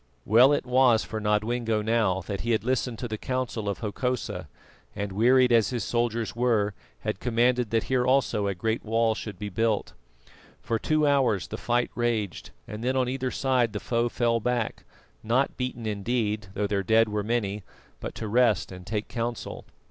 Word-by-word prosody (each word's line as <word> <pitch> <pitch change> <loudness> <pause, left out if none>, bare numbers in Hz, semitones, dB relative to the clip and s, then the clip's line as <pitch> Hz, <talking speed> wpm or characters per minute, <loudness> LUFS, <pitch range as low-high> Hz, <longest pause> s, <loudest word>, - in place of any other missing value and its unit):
Well 120 +6 +6 0.2
was 125 -3 +4
it - - -11
for 110 -1 -4
Nodwengo 110 +1 0
now 110 -4 +1
that 100 +2 -5
he 115 0 0
had 110 - 0
listened 125 -1 -1
to 120 - -4
the 110 -2 -5
counsel 125 -5 -2
of 100 - -4
Hokosa, 125 +3 -3 0.5
and, 100 0 -3
wearied 125 +5 +4
as 115 -3 +4
his 120 -4 -2
soldiers 115 -1 -1
were, 115 -4 +1 0.3
had 90 - -3
commanded 120 0 +2
that 115 0 +1
here 130 -1 +1
also 125 -6 +2
a 100 - -1
great 110 +5 -1
wall 115 0 +2
should 110 -3 -7
be 105 +2 -5
built. 110 +2 0 0.7
For 115 -1 -2
two 155 +4 +1
hours 135 -9 +2
the - - -4
fight 120 0 0
raged, 115 -7 -2 0.2
and 105 +2 -7
then 130 +2 +1
on 125 -1 +1
either 130 0 -2
side 125 -4 +1
the 105 - -2
foe 120 +2 0
fell 115 -1 +1
back, 120 0 -2 0.4
not 125 +5 +1
beaten 125 -2 -4
indeed, 105 0 -1
though 105 - 0
their 100 -1 0
dead 110 +4 +4
were 105 0 -1
many, 105 -2 -1 0.4
but - - -6
to 110 - -5
rest 115 -3 +2
and 90 -1 -10
take 105 0 -2
counsel. 120 0 -4
115 Hz, 185 wpm, -27 LUFS, 105-125 Hz, 0.7 s, Well